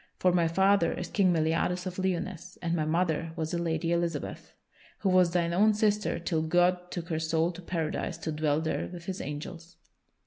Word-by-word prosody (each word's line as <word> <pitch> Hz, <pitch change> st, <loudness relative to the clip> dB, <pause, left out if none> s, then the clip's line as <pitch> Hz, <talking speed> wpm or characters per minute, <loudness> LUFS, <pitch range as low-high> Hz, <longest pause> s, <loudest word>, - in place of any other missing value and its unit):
For 180 Hz, -, +3 dB
my 175 Hz, -2 st, +3 dB
father 190 Hz, 0 st, +3 dB
is 180 Hz, -, -5 dB
King 190 Hz, -3 st, +3 dB
Meliadus 165 Hz, +2 st, +1 dB
of 185 Hz, 0 st, -5 dB
Lyonesse, 185 Hz, -1 st, -3 dB
and 170 Hz, 0 st, 0 dB
my 155 Hz, -2 st, 0 dB
mother 165 Hz, 0 st, 0 dB
was 160 Hz, -2 st, -3 dB
the 170 Hz, -, -1 dB
Lady 165 Hz, 0 st, -1 dB
Elizabeth, 170 Hz, 0 st, -2 dB, 0.5 s
who 195 Hz, -, +2 dB
was 185 Hz, -1 st, +5 dB
thine 170 Hz, -1 st, 0 dB
own 210 Hz, +4 st, +4 dB
sister 210 Hz, -1 st, +1 dB
till 165 Hz, -1 st, -1 dB
God 180 Hz, +2 st, +2 dB
took 170 Hz, -2 st, -5 dB
her 160 Hz, -2 st, -1 dB
soul 160 Hz, +1 st, +1 dB
to 180 Hz, +1 st, -10 dB
Paradise 165 Hz, -3 st, -3 dB
to 160 Hz, -, -4 dB
dwell 150 Hz, 0 st, +1 dB
there 160 Hz, -, -2 dB
with 175 Hz, -2 st, -9 dB
His 190 Hz, 0 st, -4 dB
angels." 165 Hz, +4 st, -7 dB
170 Hz, 195 wpm, -29 LUFS, 160-180 Hz, 0.5 s, was